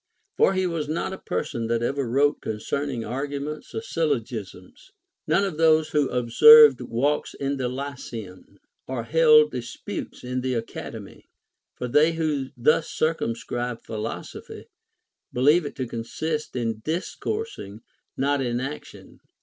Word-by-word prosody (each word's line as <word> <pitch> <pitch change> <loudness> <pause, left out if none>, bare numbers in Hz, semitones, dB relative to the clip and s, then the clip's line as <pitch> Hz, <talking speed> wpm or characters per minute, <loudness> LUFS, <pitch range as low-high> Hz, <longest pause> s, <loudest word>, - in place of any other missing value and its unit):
For 195 - +4
he 185 0 +1
was 165 -4 -2
not 170 +4 -2
a 190 - -7
person 115 -5 -3
that 115 0 0
ever 135 0 -1
wrote 140 +4 +2
concerning 120 +3 -3
arguments 145 +3 -5
or 225 - -3
syllogisms; 120 - -4 0.4
none 200 - +3
of 190 -6 -3
those 160 -1 +4
who 150 -3 +1
observed 445 - +7
walks 140 +6 -1
in 140 0 -2
the 130 -2 -1
Lyceum, 125 -8 -7 0.3
or 130 -3 -3
held 155 +2 +5
disputes 120 -2 -6
in 125 +1 -3
the 130 0 -1
Academy; 115 0 -7 0.5
for 125 - -4
they 150 +6 +4
Λνΐιο 150 -5 -2
thus 150 +6 +2
circumscribe 120 -5 -2
philosophy 110 +1 -7 0.7
be 125 - -3
lieve 150 +5 +5
it - - -9
to 130 - -3
consist 150 +7 -4
in 115 -3 -2
discoursing, 170 - -4 0.4
not 140 +1 +1
in 120 -2 -1
action. 135 +4 -8
140 Hz, 135 wpm, -25 LUFS, 120-155 Hz, 0.7 s, observed